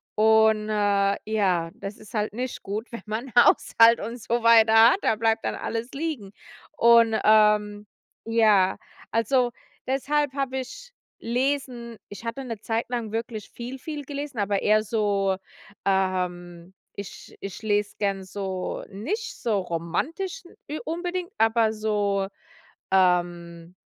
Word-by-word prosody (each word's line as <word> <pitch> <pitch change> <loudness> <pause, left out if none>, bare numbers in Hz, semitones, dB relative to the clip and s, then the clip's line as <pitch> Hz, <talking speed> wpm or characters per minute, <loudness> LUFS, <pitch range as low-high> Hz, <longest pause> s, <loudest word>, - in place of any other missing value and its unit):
und 220 0 +4
äh, 200 -1 +2
ja, 190 -6 +1
das 200 +1 -7
ist 215 - -15
halt 210 0 -1
nicht 250 +2 -4
gut, 215 +5 -5
wenn 235 - -7
man 225 +5 -5
Haushalt 230 -1 +6
und 230 +4 -6
so 235 +2 -1
weiter 225 -1 +6 0.2
hat. - - -1
Da - - +2
bleibt 225 0 0
dann - - -1
alles 230 +2 -4
liegen 280 -9 -4 0.5
und, 230 -1 +5
ähm, 210 -1 +3 0.4
ja, 215 -5 +3 0.3
also, 245 +2 +2 0.4
deshalb 280 +1 0
habe 270 -2 -2
ich 485 - -9 0.3
Lesen 245 -2 -2
ich 205 +3 -10
hatte 230 +4 -4
'ne 230 -4 -6
Zeit 225 +1 -1
lang 235 -4 -3
wirklich 225 -2 -5
viel, 245 +3 -8
viel 295 +1 -6
gelesen, 285 -2 -6
aber 200 -1 0
eher 215 +1 +3
so, 200 -3 0 0.5
ähm 180 -2 -1 0.3
ich 200 - -9
ich 195 +1 -7
lese 205 -1 0
gerne 195 -2 -1
so 190 -1 -4
nicht 315 - -4
so 220 -4 +1
romantisch 290 - -3 0.2
n 300 - -4
unbedingt, 350 +2 -3
aber 225 0 +3
so, 205 -2 0 0.6
ähm, 175 -2 +1
220 Hz, 135 wpm, -25 LUFS, 200-245 Hz, 0.6 s, Haushalt